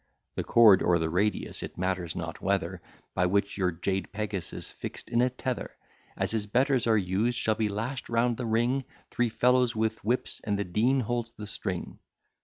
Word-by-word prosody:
The - - -2
chord, 110 -5 +7
or 90 -1 +4
the 80 -1 -1
radius, 100 +5 0
it - - -7
matters 90 -2 -2
not - - -5
whether, 95 -2 -1 0.3
By 90 - +2
which 100 +2 +1
your 95 -2 +1
jade 95 +3 -2
Pegasus, 105 -3 -4
fix'd - - -7
in 120 0 +3
a 125 - +3
tether, 125 0 -4 0.4
As - - 0
his 110 -2 -1
betters 125 +2 +2
are 110 -1 +4
used, 105 +5 +1
shall 110 - +2
be 110 -1 0
lash'd 115 +6 -4
round 115 0 +2
the 125 - -3
ring, 120 +4 +1 0.3
Three 120 -1 +1
fellows 125 +1 +3
with 110 0 -1
whips, 120 +5 -1
and 105 -1 0
the 100 - 0
Dean 115 +9 +2
holds 120 0 -2
the 105 - -8
string. 95 -4 -5
110 Hz, 190 wpm, -28 LUFS, 95-120 Hz, 0.4 s, chord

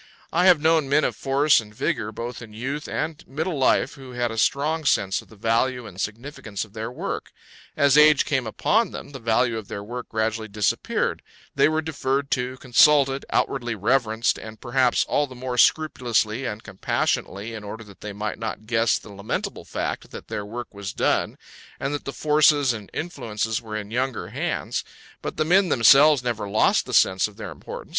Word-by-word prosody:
I 180 +3 +4
have 180 -4 +7
known 160 -2 +2
men 150 +2 +3
of - - 0
force 140 0 +3
and 105 -1 -15
vigour 110 0 -1
both 120 +2 -6
in 110 -2 -11
youth 135 +7 -4
and 155 -1 -3
middle 155 +3 -3
life 130 - +3
who 130 -2 -11
had 120 -1 -1
a 115 - -6
strong 155 +5 +1
sense 95 -8 +1
of - - -19
the 110 - -16
value 115 +3 0
and 95 -3 -7
significance 110 -2 -5
of 105 - -22
their 110 +1 -5
work; - - -5 0.5
as 140 -2 +4
age 150 -1 +6
came 130 -5 0
upon 220 - +1
them, - - -8
the 135 - -8
value 115 0 +1
of 105 - -11
their 100 - -6
work 120 +3 -7
gradually 110 0 -1
disappeared; 105 0 -1 0.3
they - - +4
were 155 0 0
deferred 140 -3 -2
to, 130 0 -1
consulted, 135 +2 +4
outwardly 120 -4 0
reverenced, 110 +2 +1
and 110 -1 -10
perhaps 125 0 +2
all 145 - +1
the 130 - -12
more 125 0 -4
scrupulously 125 -4 +2
and 105 -2 -5
compassionately 100 +1 -2
in 110 -2 -7
order 110 +2 -7
that 100 -3 -16
they 105 - -6
might 105 +1 -4
not 110 -1 -5
guess 115 0 +2
the 105 - -12
lamentable 100 +2 -4
fact - - -4
that - - -10
their 105 0 -4
work 120 +2 -7
was 100 0 -6
done - - 0 0.4
and 140 - -2
that 145 - -4
the 140 - -3
forces 150 -1 +3
and 105 -3 -8
influences 115 -9 -3
were 110 -2 -5
in 105 0 -7
younger 130 0 -2
hands. - - -2 0.4
But - - -5
the 155 - +1
men 185 +3 +4
themselves 135 +3 +6
never 110 -4 -2
lost 110 - +3
the - - -6
sense 95 +1 +4
of 105 -1 -16
their 110 - -6
importance. - - -9
120 Hz, 195 wpm, -24 LUFS, 110-140 Hz, 0.5 s, have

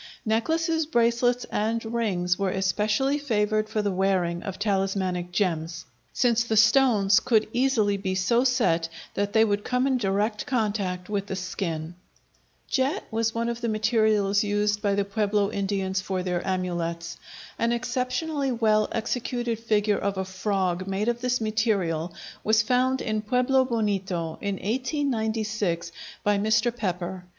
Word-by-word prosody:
Necklaces, 320 +8 +1
bracelets, 240 -2 +2
and 225 +2 -1
rings 200 -6 0
were 195 -1 +1
especially 210 +9 +1
favored 215 -5 0
for 215 -1 -1
the 205 - 0
wearing 185 -2 0
of 190 -1 -6
talismanic 190 -3 -1
gems, 170 -3 -1 0.3
since 235 -2 +2
the 225 -1 -1
stones 210 -4 +5
could 220 -3 +2
easily 235 -6 +2
be 190 -1 -2
so 235 +6 +2
set 220 -11 +2 0.2
that 205 0 -2
they 220 0 +5
would 205 -1 0
come 250 +1 0
in 265 -2 +1
direct 210 +1 -1
contact 205 -7 -1
with 200 -1 -2
the 190 - -3
skin. 170 -3 -4 0.7
Jet 265 +2 0
was 225 0 0
one 230 0 0
of 235 0 -3
the 235 - -1
materials 215 -2 +2
used 205 0 0
by 200 -2 +1
the 200 0 +1
Pueblo 205 0 0
Indians 195 -2 -1
for 190 -1 -3
their 180 -1 -1
amulets. 170 -3 -2 0.4
An 230 0 +2
exceptionally 255 +4 -1
well 215 -3 +2
executed 240 0 -2
figure 210 -2 +1
of 200 -1 -2
a 190 - -1
frog 185 -1 -1
made 195 +4 0
of 240 0 -2
this 250 0 +1
material 205 -7 0 0.3
was 220 0 +3
found 255 +3 +1
in 215 -1 -1
Pueblo 250 +4 +2
Bonito, 195 -8 -2
in 200 -1 -1
1896, 220 - -1 0.3
by 205 -1 +2
Mr. 220 +3 +2
Pepper. 185 -4 -3
210 Hz, 145 wpm, -26 LUFS, 190-235 Hz, 0.7 s, stones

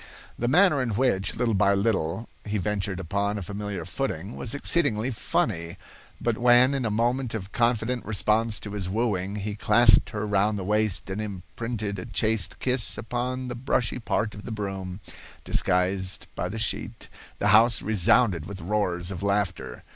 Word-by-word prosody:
The 120 - 0
manner 160 +1 +4
in 115 -5 -2
which, 115 -5 +1
little 120 -2 0
by 100 0 +3
little, 100 0 0 0.2
he 105 0 -2
ventured 100 -1 -2
upon 100 +3 -1
a 100 - -4
familiar 100 -2 -5
footing, 95 +9 -4
was 120 - -3
exceedingly 130 -6 +2
funny; 105 - -1 0.4
but 120 -2 -1
when, 125 +2 +5
in 135 -3 -1
a - - -1
moment 120 +3 0
of 95 -3 -6
confident 120 +1 0
response 110 +1 +2
to 105 - -6
his 100 -3 -4
wooing, 100 -2 -1
he 105 0 -3
clasped 110 +1 +4
her 105 -1 -3
round 105 +1 +1
the 95 - -4
waist 105 0 +1
and 100 +3 -3
imprinted 105 +1 -5
a - - -7
chaste 110 -4 0
kiss 125 -5 0
upon 125 +3 -3
the 125 - -4
brushy 125 0 -1
part 110 -2 -1
of 105 - -9
the 120 - -7
broom, 95 -3 -5 0.4
disguised 95 +1 0
by 90 - -3
the 110 - -5
sheet, 110 - -3 0.3
the 105 - +1
house 115 +3 +5
resounded 100 -4 +3
with 100 -1 -7
roars 90 -1 -1
of 95 - -6
laughter. 100 -10 -2
105 Hz, 170 wpm, -26 LUFS, 95-120 Hz, 0.4 s, when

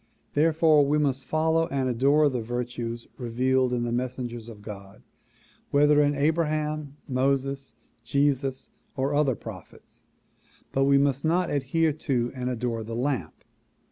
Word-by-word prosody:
Therefore 155 0 +4
we 145 +2 +2
must 135 -3 0
follow 160 +3 +1
and 135 -4 -1
adore 140 +5 +3
the 125 -4 -1
virtues 120 0 -4
revealed 130 +1 +1
in 120 -1 0
the 120 - -2
messengers 120 -1 -4
of 105 -3 -12
God 100 -2 -10 0.7
whether 145 +1 +4
in 145 0 +2
Abraham, 155 -1 -1
Moses, 135 +1 -1 0.3
Jesus 135 0 0 0.2
or 135 +2 0
other 145 -4 +2
prophets - - -12 0.7
but 135 0 +2
we 140 0 +5
must 140 -1 +1
not 170 +2 +1
adhere 145 +3 +1
to 125 -5 -1
and 125 -1 -3
adore 120 -2 -2
the 115 +1 -6
lamp. 130 +1 -2
135 Hz, 140 wpm, -26 LUFS, 125-150 Hz, 0.7 s, we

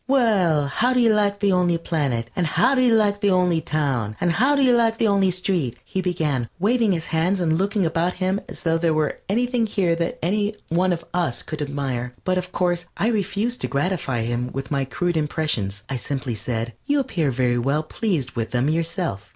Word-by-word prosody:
"Well, 200 - +3
how 245 - +1
do 250 - +2
you 230 -2 +4
like 205 -1 +1
the 200 -1 +3
Only 180 -2 +2
Planet? 140 -9 -2
and 175 - 0
how 260 - +3
do 260 - +3
you 240 -3 +4
like 205 -2 +2
the 205 - +3
Only 180 -3 +2
Town? 135 -9 -1
and 175 - +1
how 255 +11 +3
do 280 - +3
you 250 -2 +5
like 225 -1 +2
the 230 - +2
Only 200 -2 +3
Street?" 175 - -1
he 190 - -2
began, 150 -10 -1
waving 220 +3 +2
his 165 -3 -1
hands 175 +4 +1
and 160 -3 +1
looking 200 0 +1
about 165 +2 0
him 185 +2 -1
as - - -9
though 165 -1 +1
there 165 -2 +1
were 155 -1 0
anything 240 +2 +1
here 185 -5 +1
that 170 0 -2 0.5
one 180 +3 +2
of 170 -1 -3
us 165 -10 -1
could 155 -1 -6
admire. 135 -4 -3
But, 185 0 +1
of 180 0 -7
course, 175 -1 0
I 220 - +2
refused 215 +3 -1
to - - -1
gratify 140 -5 -1
him 120 +2 -2
with 135 +2 -5
my 140 -2 0
crude 175 +6 -1
impressions. 140 -10 -1
I 135 - -3
simply 130 0 -3
said: 115 +2 -3
"You 285 0 +2
appear 175 - 0
very 125 -1 +1
well 140 +5 0
pleased 155 - -2
with 115 -3 -3
them 125 +3 +1
yourself." 165 - -2
170 Hz, 210 wpm, -22 LUFS, 140-200 Hz, 0.5 s, you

